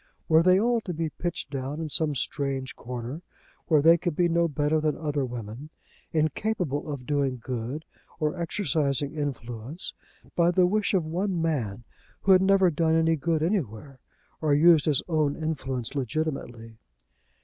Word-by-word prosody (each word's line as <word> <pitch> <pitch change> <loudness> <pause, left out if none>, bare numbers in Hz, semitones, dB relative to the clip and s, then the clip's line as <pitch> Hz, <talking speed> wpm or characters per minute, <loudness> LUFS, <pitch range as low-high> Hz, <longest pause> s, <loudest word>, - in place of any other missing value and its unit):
Were 160 0 +6
they 185 +2 +5
all 235 +1 +2
to 180 -5 -5
be 160 -1 -2
pitched 175 -5 -4
down 135 +2 -4
in 160 - -3
some 150 0 0
strange 135 -1 -2
corner, 125 +5 -6 0.5
where 155 -4 +4
they 165 +1 +7
would 175 -4 -1
be 175 +1 +3
no 170 0 +2
better 150 +1 0
than 155 -1 0
other 150 -3 -1
women, 120 +3 -6 0.4
incapable 155 -1 -1
of 135 -3 -6
doing 140 -3 0
good 125 +5 -5 0.3
or 155 +2 0
exercising 150 -6 0
influence, 135 0 -4 0.4
by 170 0 +4
the 180 +1 +4
wish 205 +2 +1
of 175 -4 +1
one 180 +3 -1
man 120 -10 -1 0.4
who 195 - +3
had 185 -1 +7
never 190 -2 +4
done 160 +1 +2
any 165 0 +3
good 160 +1 0
anywhere, 140 - -2 0.4
or 150 -2 +3
used 160 -1 +6
his 150 -4 +2
own 155 -4 +1
influence 135 -7 -3
legitimately? 125 -5 -3
155 Hz, 160 wpm, -27 LUFS, 135-170 Hz, 0.5 s, they